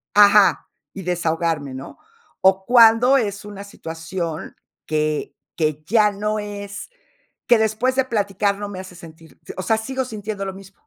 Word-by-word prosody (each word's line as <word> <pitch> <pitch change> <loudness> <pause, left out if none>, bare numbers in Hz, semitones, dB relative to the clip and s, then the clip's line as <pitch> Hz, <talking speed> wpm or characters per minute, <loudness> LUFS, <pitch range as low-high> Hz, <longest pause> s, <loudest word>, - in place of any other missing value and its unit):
ajá, 205 -6 +5 0.2
y 195 - -7
desahogarme, 165 -4 -1
¿no? 130 +1 -9 0.4
O, 190 0 +3
cuándo 240 +2 +6
es 205 -5 -2
una 205 -1 -8
situación 165 -3 -6 0.3
que 155 -1 -1 0.2
que 155 -2 -1
ya 215 -2 +4
no 210 +2 -2
es 205 -1 -7 0.6
que 240 - +6
después 220 +4 +1
de 265 - +3
platicar 205 -3 0
no 205 0 -5
me 190 -2 -7
hace 185 -1 -10
sentir 165 -1 -14 0.2
o - - -2
sea, 220 - +2
sigo 260 +4 -3
sintiendo 210 -3 -5
lo 190 - -4
mismo. 195 0 -13
200 Hz, 155 wpm, -21 LUFS, 170-215 Hz, 0.6 s, cuándo